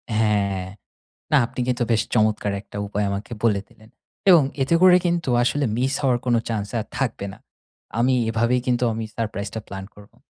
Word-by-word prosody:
হ্যাঁ, 100 Hz, -3 st, +1 dB, 0.7 s
না 150 Hz, -, +6 dB
আপনি 125 Hz, -, -7 dB
কিন্তু 125 Hz, -1 st, 0 dB
বেশ 110 Hz, -, +3 dB
চমৎকার 105 Hz, -2 st, +2 dB
একটা 105 Hz, -, -12 dB
উপায় 105 Hz, +1 st, -1 dB
আমাকে 100 Hz, +4 st, -5 dB
বলে 105 Hz, -4 st, +3 dB
দিলেন। 110 Hz, +1 st, -20 dB, 0.4 s
এবং 170 Hz, -4 st, +8 dB, 0.2 s
এতে 150 Hz, +5 st, +1 dB
করে 185 Hz, -1 st, +8 dB
কিন্তু 170 Hz, -3 st, 0 dB
আসলে 145 Hz, +4 st, +1 dB
মিস 130 Hz, +3 st, 0 dB
হওয়ার 130 Hz, -3 st, +2 dB
কোনো 120 Hz, -1 st, +3 dB
চান্স 105 Hz, -3 st, -2 dB
আর 110 Hz, -, -6 dB
থাকবে 125 Hz, -6 st, -2 dB
না। -, -, -13 dB, 0.6 s
আমি 130 Hz, +2 st, +3 dB, 0.2 s
এভাবেই 115 Hz, +3 st, +1 dB
কিন্তু 125 Hz, 0 st, +1 dB
আমি 110 Hz, 0 st, -3 dB
সারপ্রাইজটা 110 Hz, -1 st, -3 dB
প্লান 95 Hz, 0 st, -6 dB
করবো। 105 Hz, -1 st, -17 dB
115 Hz, 175 wpm, -23 LUFS, 105-125 Hz, 0.7 s, এবং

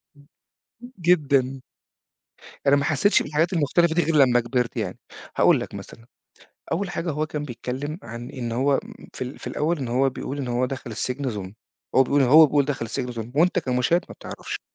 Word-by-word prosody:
امم، 145 Hz, 0 st, -21 dB, 0.5 s
امم، 245 Hz, +1 st, -11 dB
جدًا. 140 Hz, -6 st, +2 dB, 1.0 s
ده -, -, +5 dB
أنا -, -, +7 dB
ما 140 Hz, -, +1 dB
حسيتش 155 Hz, +8 st, +3 dB
بالحاجات 155 Hz, +4 st, 0 dB
المختلفة 165 Hz, +1 st, +2 dB
دي 175 Hz, -, +3 dB
غير 165 Hz, -, 0 dB
لمّا 130 Hz, -4 st, +5 dB
كبرت 120 Hz, 0 st, -1 dB
يعني. 100 Hz, -5 st, -3 dB, 0.4 s
هاقول -, -, +5 dB
لك -, -, -7 dB
مثلًا، 115 Hz, -, -10 dB, 0.7 s
أول 180 Hz, +3 st, -1 dB
حاجة 170 Hz, -1 st, -3 dB
هو 155 Hz, +1 st, -1 dB
كان 150 Hz, -1 st, -4 dB
بيتكلم 135 Hz, +4 st, -5 dB
عن 120 Hz, +1 st, -8 dB
إن 120 Hz, -3 st, -5 dB
هو 135 Hz, +4 st, +2 dB
م -, -, -13 dB
في -, -, -5 dB
ال 125 Hz, +3 st, -8 dB
في -, -, -12 dB
الأول 160 Hz, +3 st, -1 dB
إن 130 Hz, -4 st, -4 dB
هو 130 Hz, +3 st, +2 dB
بيقول 135 Hz, +2 st, -6 dB
إن 135 Hz, -3 st, -3 dB
هو 120 Hz, +1 st, +1 dB
دخل 130 Hz, -2 st, -6 dB
السجن 130 Hz, +5 st, -3 dB
ظلم، 100 Hz, -3 st, -6 dB, 0.4 s
وهو 130 Hz, -, +7 dB
بيقول 140 Hz, +2 st, +2 dB
هو 155 Hz, +5 st, +8 dB
بيقول 145 Hz, 0 st, +2 dB
دخل 135 Hz, -4 st, -2 dB
السجن 125 Hz, +2 st, -4 dB
ظلم 115 Hz, 0 st, -6 dB
وأنت 175 Hz, +5 st, +3 dB
كمشاهد 130 Hz, +4 st, +1 dB
ما -, -, -9 dB
بتعرفش، -, -, -7 dB
135 Hz, 200 wpm, -24 LUFS, 125-155 Hz, 1.0 s, هو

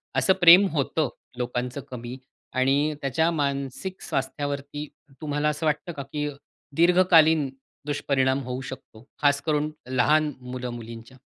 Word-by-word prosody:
असं 190 Hz, -, +4 dB
प्रेम 175 Hz, +3 st, +9 dB
होतं, 150 Hz, -1 st, 0 dB, 0.3 s
लोकांचं 125 Hz, +2 st, -3 dB
कमी 120 Hz, 0 st, -7 dB, 0.4 s
आणि 140 Hz, +4 st, +2 dB
त्याच्या 160 Hz, +5 st, +1 dB
मानसिक 140 Hz, +4 st, -3 dB
स्वास्थ्यावरती 145 Hz, +2 st, -3 dB, 0.3 s
तुम्हाला 150 Hz, 0 st, 0 dB
असं 150 Hz, +2 st, -3 dB
वाटतं 155 Hz, +4 st, -1 dB
का 140 Hz, -, -6 dB
की 150 Hz, -1 st, -1 dB, 0.5 s
दीर्घकालीन 165 Hz, -4 st, +5 dB, 0.4 s
दुष्परिणाम 140 Hz, -2 st, +1 dB
होऊ 125 Hz, +1 st, -4 dB
शकतो? 130 Hz, -3 st, -10 dB
खास 145 Hz, -1 st, +3 dB
करून 150 Hz, 0 st, 0 dB, 0.2 s
लहान 150 Hz, +4 st, +3 dB
मुलं-मुलींच्या. 120 Hz, -1 st, -7 dB
145 Hz, 115 wpm, -25 LUFS, 130-155 Hz, 0.5 s, प्रेम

